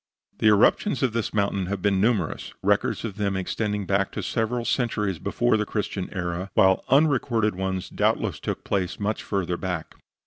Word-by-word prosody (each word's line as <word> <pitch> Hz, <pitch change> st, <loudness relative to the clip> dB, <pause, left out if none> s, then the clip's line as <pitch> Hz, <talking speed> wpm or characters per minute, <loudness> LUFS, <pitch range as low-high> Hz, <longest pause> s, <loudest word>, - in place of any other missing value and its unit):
The -, -, +3 dB
eruptions 120 Hz, -, +4 dB
of 125 Hz, -4 st, +1 dB
this 115 Hz, -2 st, -1 dB
mountain 100 Hz, -2 st, 0 dB
have 100 Hz, 0 st, -2 dB
been 95 Hz, 0 st, +1 dB
numerous, 105 Hz, -7 st, 0 dB
records -, -, +1 dB
of 105 Hz, -4 st, -6 dB
them 100 Hz, -2 st, 0 dB
extending 105 Hz, +2 st, -2 dB
back 100 Hz, +1 st, +1 dB
to -, -, -4 dB
several 115 Hz, +1 st, -1 dB
centuries 105 Hz, -9 st, 0 dB
before 120 Hz, +6 st, +1 dB
the 105 Hz, -, +1 dB
Christian 100 Hz, -3 st, -3 dB
era, 90 Hz, 0 st, -3 dB
while 95 Hz, 0 st, +4 dB
unrecorded 130 Hz, -6 st, +3 dB
ones 95 Hz, 0 st, -3 dB
doubtless -, -, 0 dB
took -, -, -4 dB
place 95 Hz, -3 st, -2 dB
much 105 Hz, +1 st, -1 dB
further 90 Hz, -3 st, -2 dB
back. 90 Hz, -4 st, -4 dB
100 Hz, 170 wpm, -25 LUFS, 95-115 Hz, -, eruptions